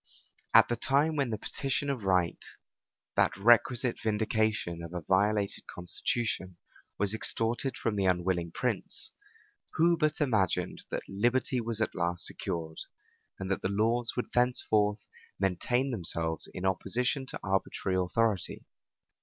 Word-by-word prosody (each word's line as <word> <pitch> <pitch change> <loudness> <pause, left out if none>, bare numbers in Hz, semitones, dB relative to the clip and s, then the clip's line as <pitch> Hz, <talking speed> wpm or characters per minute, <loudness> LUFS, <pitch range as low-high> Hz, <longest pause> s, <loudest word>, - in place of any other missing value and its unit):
At - - +7
the 120 - 0
time 140 +6 +2
when 140 -4 +1
the 110 - -2
petition 135 +6 -2
of 135 -6 -2
right, 90 -3 +1 0.7
that - - +2
requisite 120 +3 +4
vindication 110 -5 0
of 85 +1 -7
a 90 - -2
violated 100 +4 +1
constitution, 95 0 -2 0.4
was 100 0 +2
extorted 115 +4 0
from 115 - -1
the 100 -1 +1
unwilling 90 -2 0
prince, - - -2 0.6
who 170 +2 +4
but 155 -2 0
imagined 110 - 0
that - - -4
liberty 120 - +1
was 115 -1 -3
at 110 - 0
last 85 0 -1
secured, 80 -4 -4 0.6
and 95 0 -4
that 95 - 0
the - - -1
laws 115 +4 +1
would 125 - -3
thenceforth 110 -4 +2 0.3
maintain 120 +8 +1
themselves 80 - -1
in 90 - -5
opposition 125 +8 0
to - - -6
arbitrary 95 -1 0
authority? 105 +1 0
105 Hz, 135 wpm, -30 LUFS, 95-120 Hz, 0.7 s, At